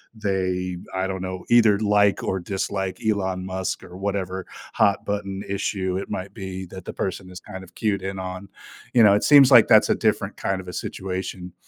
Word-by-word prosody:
they, 95 -3 -2 0.2
I 95 0 -1
don't 95 -1 -4
know, 95 -1 -5
either 110 -4 +5
like 105 -1 +3
or 95 - -1
dislike 95 0 -3
Elon 95 -3 0
Musk 95 0 -3
or 90 - -11
whatever 95 -1 -3 0.3
hot 100 -1 +2
button 100 -1 -3
issue 95 -1 -2
it 95 - -5
might 95 +1 -5
be 95 -3 -6
that 95 0 -10
the - - -6
person 95 -1 -4
is 90 -1 -9
kind 95 +2 -9
of 90 -1 -17
cued 100 -4 0
in 95 0 -4
on. 95 +1 -6 0.4
You 120 -2 +6
know, 100 - +7
it 105 - +2
seems 140 -2 +7
like 120 -3 +8
that's - - +6
a - - +3
different - - 0
kind 95 -1 -2
of 90 - -15
a 90 - -7
situation 90 -1 -5
95 Hz, 200 wpm, -23 LUFS, 95-100 Hz, 0.4 s, like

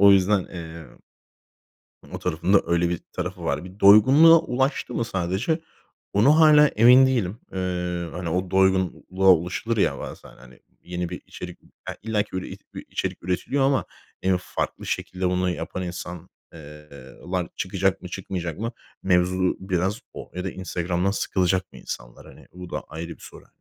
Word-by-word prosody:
o 100 0 +8
yüzden, 95 0 +3
eee, 85 -3 -9 1.3
o - - -4
tarafın 90 +2 -1
da 100 - +6
öyle 85 0 +2
bir 90 - -2
tarafı - - -5
var. - - -1
Bir 95 +3 -12
doygunluğa 135 +12 +8
ulaştı 135 -1 -1
mı 115 - 0
sadece, 95 - -1 0.5
ona 125 +10 +5
hâlâ 150 -1 +7
emin 125 +4 +6
değilim. 115 -5 -1
Eee, 90 -2 -2
hani, 90 -2 -4
o 90 +2 -1
doygunluğa 95 0 +2
ulaşılır 90 +7 -1
ya 70 -9 +1
bazen, - - -9
hani, 65 0 -17 0.2
yeni 90 -1 -4
bir 90 - -7
içerik 90 -1 -9 0.3
Ya, - - -4
illaki, 105 -1 -1
böyle, 95 - -4
it - - -10
bir - - -7
içerik - - -3
üretiliyor 130 +10 0
ama 135 - +2 0.4
en 95 -1 +2
farklı 90 - -4
şekilde 90 0 -2
bunu 90 0 0
yapan 90 +1 -4
insan, 90 0 -6 0.2
eee 75 -1 -12 0.4
lar 90 -2 -1
çıkacak 95 0 -1
mı 90 - -7
çıkmayacak 90 -3 -5
mı? 115 +2 -3 0.3
Mevzu 90 0 +2
biraz 95 +2 -1
o - - -9
ya 90 +1 -4
da 95 - -2
Instagram'dan 90 0 -2
sıkılacak 95 -2 0
mı - - -12
insanlar? - - -8
Hani, - - -15
bu 90 -1 -10
da - - -3
ayrı 80 +1 -6
bir 85 - -10
soru, - - -12
hani. - - -32
95 Hz, 170 wpm, -24 LUFS, 90-100 Hz, 1.3 s, o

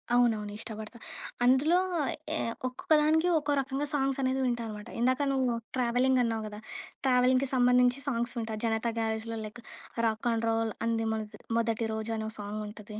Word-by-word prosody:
అవునవును 225 -4 +2
ఇష్టపడతాను. 220 +1 -7 0.4
అందులో 285 +8 +5 0.6
ఎ - - 0 0.3
ఒక్కొక్క 255 +5 -9
దానికి 320 +3 +3
ఒక్కో 290 -1 0
రకంగా 270 +2 -2
సాంగ్సనేది 270 -1 +1
వింటా 240 -1 0
అనమాట. 210 +1 -7
ఇందాక 255 +3 +2
నువ్వు 260 -2 +2 0.3
ట్రావెలింగ్ 250 +1 +3
అన్నావు 225 -2 -1
గదా! 210 0 -8 0.5
ట్రావెలింగ్‌కి 255 +1 +4
సంబంధించి 250 +1 +4
సాంగ్స్ 240 -2 -1
వింటా. 220 -1 -2
'జనతా 225 +1 +1
గ్యారేజ్‌' 220 0 -1
లో 225 - -3
లైక్ 225 +3 -9 0.4
'రాక్ 220 +1 0
అండ్ 230 0 0
రోల్ 225 -1 +1
అంది 225 -1 +1
మొనటి 215 -1 -5 0.2
మొదటి 230 0 0
రోజు' 220 +1 -3
అని 220 - -3
ఒక 220 - -7
సాంగుంటది 210 +1 -6
235 Hz, 155 wpm, -30 LUFS, 220-255 Hz, 0.6 s, అందులో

